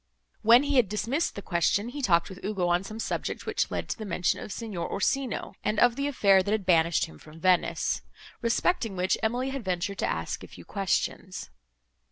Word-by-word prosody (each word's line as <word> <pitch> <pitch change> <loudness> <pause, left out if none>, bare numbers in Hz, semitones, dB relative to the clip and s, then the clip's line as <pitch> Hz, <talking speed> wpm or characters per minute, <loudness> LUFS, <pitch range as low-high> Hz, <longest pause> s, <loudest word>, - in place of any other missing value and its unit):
When 235 +4 +7
he 285 -1 +1
had 235 -7 +4
dismissed 240 - -1
the 200 - -6
question, 195 +5 +1
he 285 +3 -6
talked 170 -8 +3
with 190 0 -11
Ugo 195 -3 -1
on 175 +1 +2
some 215 +3 -8
subject, - - -3
which - - 0
led - - -3
to - - -2
the - - -4
mention 180 -3 0
of - - -7
Signor 205 -8 -4
Orsino 260 +5 -1
and 215 - 0
of 245 -1 +5
the 280 +1 -1
affair 200 -9 +4
that 200 - -2
had 215 -3 0
banished 170 -2 +3
him 75 - -14
from 155 +1 -14
Venice; 185 0 +2 0.4
respecting 230 - +1
which 185 +1 +1
Emily 245 +4 0
had 270 -3 -4
ventured 185 +1 -2
to - - +1
ask - - -3
a - - -9
few - - -13
questions. 190 -1 -2
200 Hz, 205 wpm, -28 LUFS, 185-240 Hz, 0.4 s, When